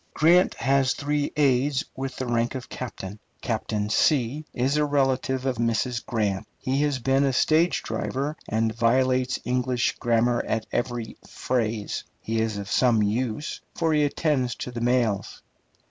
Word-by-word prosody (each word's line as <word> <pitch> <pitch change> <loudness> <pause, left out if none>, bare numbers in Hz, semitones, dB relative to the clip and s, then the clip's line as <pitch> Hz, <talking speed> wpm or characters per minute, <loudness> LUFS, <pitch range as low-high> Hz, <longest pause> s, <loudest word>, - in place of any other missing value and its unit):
Grant 175 +4 +4
has 135 -1 +2
three 145 0 -1
aides 135 -1 +2
with 135 0 -4
the 130 - -3
rank 120 +1 0
of 130 -1 -6
captain. 105 -5 -7 0.2
Captain 105 -1 -2 0.7
is 130 +4 +1
a 150 - +3
relative 135 -2 +1
of 130 -3 0
Mrs. 115 +1 0
Grant. 105 -4 -1
He 135 +1 -1
has 145 -2 +1
been 135 +2 +2
a 135 - +2
stage 160 +6 +2
driver, 140 +3 -2
and 110 +1 +1
violates 130 +2 +2
English 125 -1 0
grammar 120 0 +2
at 110 -1 -1
every 120 -2 -3
phrase. 115 -4 -2 0.2
He 115 0 -2
is 110 -2 -1
of 100 -1 -5
some 120 -4 +3
use, 115 +6 -2
for 165 -2 +1
he 150 -1 +3
attends 145 -4 0
to 125 - -6
the 120 -1 -5
mails. 120 -5 0
125 Hz, 150 wpm, -25 LUFS, 115-135 Hz, 0.7 s, Grant